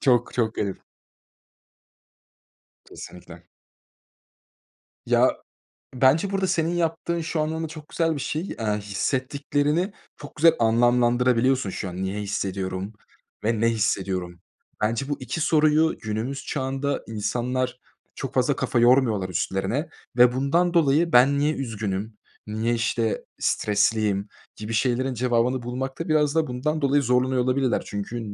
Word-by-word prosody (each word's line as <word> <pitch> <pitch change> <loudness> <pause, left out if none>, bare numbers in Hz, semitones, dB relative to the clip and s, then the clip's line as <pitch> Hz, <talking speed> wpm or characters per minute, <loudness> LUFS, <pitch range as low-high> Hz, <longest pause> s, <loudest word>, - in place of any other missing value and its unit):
Çok 120 -3 +2
çok 115 -2 0
garip. 100 -2 -4 2.0
Kesinlikle. - - -12 1.6
Ya, - - +3 0.6
bence 135 +10 +3
burada 195 -1 0
senin 165 0 0
yaptığın 170 0 -1
şu 160 0 -3
anlamda 160 +1 -2
çok 155 -1 -11
güzel 165 -1 0
bir - - -4
şey, 150 +4 -2 0.2
eee, 105 -2 0
hissettiklerini 145 - -1 0.2
çok 145 - -11
güzel 165 +2 +6
anlamlandırabiliyorsun. 120 +1 +3
Şu 95 0 -4
an 90 - -8
niye 95 +2 -3
hissediyorum 95 0 -3 0.5
ve 115 0 +1
ne 115 - +4
hissediyorum? 95 -5 -1 0.4
Bence 115 +6 0
bu 145 - -1
2 140 +5 -4
soruyu 155 -1 +3
günümüz 115 +6 -4
çağında 135 0 -2
insanlar 125 +4 -2 0.4
çok - - -5
fazla - - +2
kafa 120 - 0
yormuyorlar, 120 -6 +3
üstlerine 95 - -2 0.3
ve 125 0 +6
bundan 170 +7 +1
dolayı 165 +1 +3
ben 135 +3 +5
niye 150 +2 +2
üzgünüm, 110 -4 -4 0.3
niye, 110 +3 -1
işte, 115 -1 -1
stresliyim 105 -1 +1 0.3
gibi 105 +2 -6
şeylerin 130 +3 +1
cevabını 125 +1 +1
bulmakta 130 +7 -4
biraz 150 -1 +2
da 160 -3 +2
bundan 150 +5 -2
dolayı 140 +1 +3
zorlanıyor 125 +1 +2
olabilirler. 130 0 +1
Çünkü 100 +4 -5
125 Hz, 125 wpm, -24 LUFS, 110-145 Hz, 2.0 s, güzel